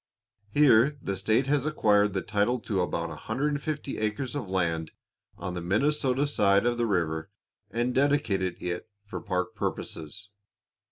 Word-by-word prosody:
Here 140 +2 +5
the 100 - -3
state 110 +7 +2
has 145 +1 +1
acquired 105 -8 +3
the 95 - -1
title 105 +5 +1
to 100 -5 -1
about 85 -1 -2
150 145 - -3
acres 110 +4 -2
of 140 -8 -3
land 85 -4 -1 0.4
on 90 - -4
the 90 - -4
Minnesota 135 - +1
side 100 -7 +3
of 120 0 +1
the 120 - +2
river, 80 -5 -1 0.4
and 120 +2 -1
dedicated 115 -10 +1
it 90 +4 -3 0.2
for 100 - -6
park 90 -1 -2
purposes. 100 +7 -4
105 Hz, 145 wpm, -28 LUFS, 95-135 Hz, 0.4 s, Here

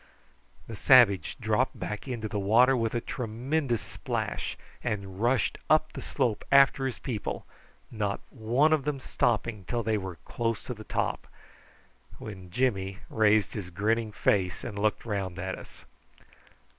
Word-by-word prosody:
The 115 - -7
savage 105 - +5
dropped 115 +3 +1
back 105 +6 -5
into 120 -4 -3
the 105 0 -3
water 120 +7 +5
with 115 -1 -1
a 120 - 0
tremendous 125 +2 -2
splash, - - -3 0.3
and 100 -4 -3
rushed 120 -1 +1
up 155 0 +3
the - - -6
slope 120 -7 -1
after 140 -1 +6
his 130 - -4
people, 115 -6 -4 0.5
not 105 -3 -1
one 125 +7 +2
of 155 -3 +2
them 145 -1 -2
stopping 115 -4 0
till 120 -1 -1
they 110 -1 +1
were 95 -2 -6
close 115 -2 -2
to 125 - -5
the 110 -2 -10
top, - - -2 0.9
when 95 -4 -9
Jimmy 100 -3 0
raised 110 -2 +3
his 100 -5 -5
grinning 110 +4 0
face 95 -3 +1
and 105 -5 -5
looked 105 +2 0
round 100 -5 -3
at 95 +1 -3
us. - - -14
110 Hz, 150 wpm, -28 LUFS, 100-125 Hz, 0.9 s, after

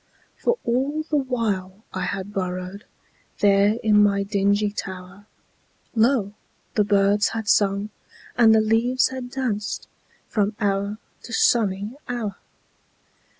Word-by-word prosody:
For 475 0 0
all 270 +6 0
the 310 -1 -3
while 220 -8 -2
I 185 -1 -2
had 200 +1 -4
burrowedThere 195 +2 -1
in 210 -1 +5
my 200 -1 +3
dingy 205 +1 +1
tower, 190 0 -8 0.7
Lo! 225 -3 +2 0.4
the 210 - +3
birds 200 0 +3
had 220 -2 -4
sung 200 +1 +2 0.4
and 225 -2 +6
the 220 - +5
leaves 230 +4 +2
had 260 -1 -6
dancedFrom 210 -3 -3
hour 200 0 0 0.2
to - - -11
sunny 205 -3 +2 0.2
hour. 225 -5 -3
205 Hz, 110 wpm, -23 LUFS, 200-230 Hz, 0.7 s, and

